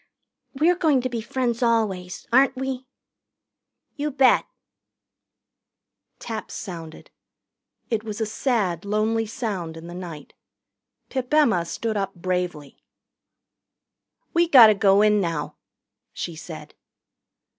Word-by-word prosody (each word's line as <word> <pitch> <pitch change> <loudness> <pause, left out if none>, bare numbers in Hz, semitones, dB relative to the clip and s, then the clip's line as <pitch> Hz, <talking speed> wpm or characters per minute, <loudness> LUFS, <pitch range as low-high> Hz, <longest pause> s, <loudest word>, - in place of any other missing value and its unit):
"We're 330 +6 +3
going 305 -7 +3
to 255 - -2
be 235 -2 -3
friends 240 0 -2
always, 210 -7 0
aren't 265 +1 +5
we?" 260 0 -4 1.1
"You 295 +1 -2
bet." 270 -2 +4 1.7
Taps 220 -2 -6
sounded. 165 -5 -8 0.8
It 220 -2 0
was 215 -1 -6
a 220 - 0
sad, 210 - -1
lonely 215 +2 0
sound 190 -8 -4
in 165 - -10
the 175 - -8
night. 170 -5 -8 0.8
Pip 260 0 -4
Emma 240 - +3
stood 220 +5 -3
up 195 -1 -3
bravely. 175 -5 -4 1.5
"We 340 +1 +3
gotter 235 -8 +9
go 200 0 +4
in 210 -1 +4
now," 165 -4 -3 0.6
she 170 - -5
said. 155 -2 -9
215 Hz, 115 wpm, -24 LUFS, 180-255 Hz, 1.7 s, gotter